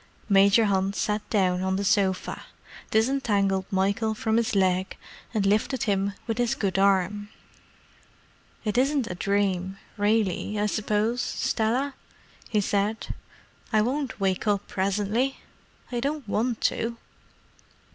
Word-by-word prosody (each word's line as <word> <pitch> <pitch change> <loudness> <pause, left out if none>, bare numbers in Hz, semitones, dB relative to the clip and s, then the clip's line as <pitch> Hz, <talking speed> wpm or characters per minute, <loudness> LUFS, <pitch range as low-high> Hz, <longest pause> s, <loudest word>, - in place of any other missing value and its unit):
Major 200 +3 +5
Hunt 195 -1 +1
sat 210 0 0
down 185 -4 +2
on 190 0 0
the 200 - -1
sofa, 195 -1 0 0.4
disentangled 210 -5 +1
Michael 200 +3 +1
from 220 +1 0
his 230 -2 0
leg, 185 -1 +1 0.3
and 215 -4 0
lifted 215 +5 +1
him 200 -1 0
with 225 0 -2
his 240 -1 +1
good 195 -2 -1
arm. 200 +1 +2 1.4
"It 215 +3 +1
isn't 275 0 +2
a - - -2
dream, 190 0 0 0.2
really, 210 -1 +1
I 210 - +2
suppose, 215 +3 0
Stella?" 245 +4 0 0.6
he 210 -2 +2
said. 205 +2 -1 0.6
"I 215 -2 +4
won't 265 +1 -2
wake 195 +1 0
up 205 -1 +1
presently? 205 +7 0 0.5
I 240 - -1
don't 280 0 -2
want 225 +3 -1
to." 230 +1 0
210 Hz, 125 wpm, -26 LUFS, 195-225 Hz, 1.4 s, Major